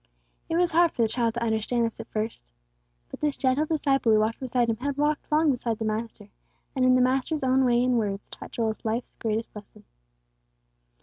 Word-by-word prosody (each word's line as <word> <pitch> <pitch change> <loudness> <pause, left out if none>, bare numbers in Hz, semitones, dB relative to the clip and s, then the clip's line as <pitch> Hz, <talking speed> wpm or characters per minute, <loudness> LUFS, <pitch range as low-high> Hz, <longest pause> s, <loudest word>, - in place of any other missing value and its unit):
It 325 - 0
was 350 0 +2
hard 335 0 +4
for 235 - 0
the - - +3
child 230 0 -1
to 235 - -2
understand 230 +1 0
this 230 - -5
at - - -7
first; 215 - -4 0.6
but - - -8
this 295 -2 -1
gentle 270 +4 +1
disciple 275 -6 +1
who 215 - +5
walked 220 +2 0
beside 250 -2 0
him 225 -1 0
had 280 +3 -3
walked 295 +1 -1
long 305 0 +4
beside 235 -3 -2
the 220 - -3
Master, 215 -1 -4 0.5
and 260 - +1
in 255 0 +5
the 255 - +4
Master's 265 +4 0
own 260 0 +3
way 240 0 +3
and 250 -1 +2
words 200 -2 -3
taught - - -10
Joel 225 -2 -1
life's 225 +2 -3
greatest 225 0 -3
lesson. 210 -1 -12
245 Hz, 205 wpm, -26 LUFS, 225-270 Hz, 0.6 s, who